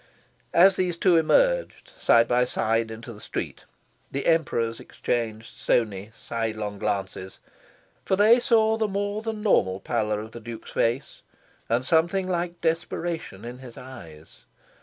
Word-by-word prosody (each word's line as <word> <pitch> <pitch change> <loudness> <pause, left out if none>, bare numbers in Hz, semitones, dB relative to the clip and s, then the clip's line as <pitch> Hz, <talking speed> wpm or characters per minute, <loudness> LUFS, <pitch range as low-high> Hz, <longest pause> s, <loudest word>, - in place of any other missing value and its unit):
As 185 +3 +7
these 180 -2 0
two 180 0 +4
emerged, - - +2
side 115 0 +5
by 125 +1 +3
side, 115 -2 0
into 115 +1 -8
the 105 - -13
street, - - -5 0.5
the 140 - -3
Emperors 120 -8 +1
exchanged 115 -2 -3
stony 105 -3 0
sidelong 110 -3 -4
glances. 95 -2 -3 0.7
For 190 - +1
they 215 +5 +6
saw 220 -3 +3
the 220 -1 +1
more 205 +1 -2
than 220 -1 -4
normal 95 - +2
pallor 105 -1 -1
of 110 +1 -8
the 120 - -8
Duke's 115 0 -9
face, 120 +4 -1 0.5
and 120 +3 +1
something 170 +6 +2
very 185 - -2
like 175 0 -4
desperation 165 - -2
in 120 +1 -7
his 125 -3 -11
eyes. 85 -12 -12
125 Hz, 145 wpm, -25 LUFS, 110-180 Hz, 0.7 s, As